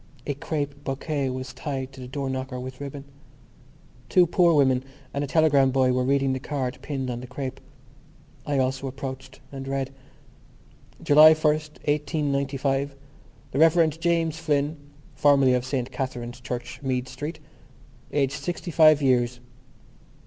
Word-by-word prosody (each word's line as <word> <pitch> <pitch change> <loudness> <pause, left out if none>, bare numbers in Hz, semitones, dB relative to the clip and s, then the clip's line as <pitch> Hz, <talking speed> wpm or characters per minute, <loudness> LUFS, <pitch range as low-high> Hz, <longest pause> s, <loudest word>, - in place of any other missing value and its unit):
A 145 - -1
crape 145 0 -4
bouquet 140 0 -2
was 130 0 -5
tied 135 -2 -4
to 130 - -11
the 125 - -7
door 140 +1 -4
knocker 130 -1 -4
with 130 +1 -8
ribbon. 140 0 -7 1.0
Two 180 +8 +5
poor 170 -1 +3
women 130 -3 +3 0.3
and 140 - -1
a - - -3
telegram 145 -3 +4
boy 130 -1 +2
were 125 0 +1
reading 135 0 +2
the 130 - -2
card 130 -2 -3
pinned 135 -3 -3
on 120 0 -5
the 125 - -8
crape. 130 +1 -5 0.8
I 145 -2 -1
also 130 +1 0
approached 130 0 -7
and 135 -1 -7
read: 135 0 -2 1.1
July 155 +2 +8
1st, 155 0 -1
1895 140 -2 0 0.6
The 135 - -1
Rev. 160 -1 +4
James 165 -2 +1
Flynn 150 -1 0 0.4
(formerly 140 -3 +4
of 125 +1 -1
S. 130 -4 0
Catherine's 125 -2 -5
Church, 125 0 -6
Meath 130 -2 -1
Street), 150 +5 -6 0.7
aged 140 -1 0
sixty 175 0 -4
five 155 -2 +6
years. 125 -2 +2
135 Hz, 145 wpm, -25 LUFS, 130-150 Hz, 1.1 s, July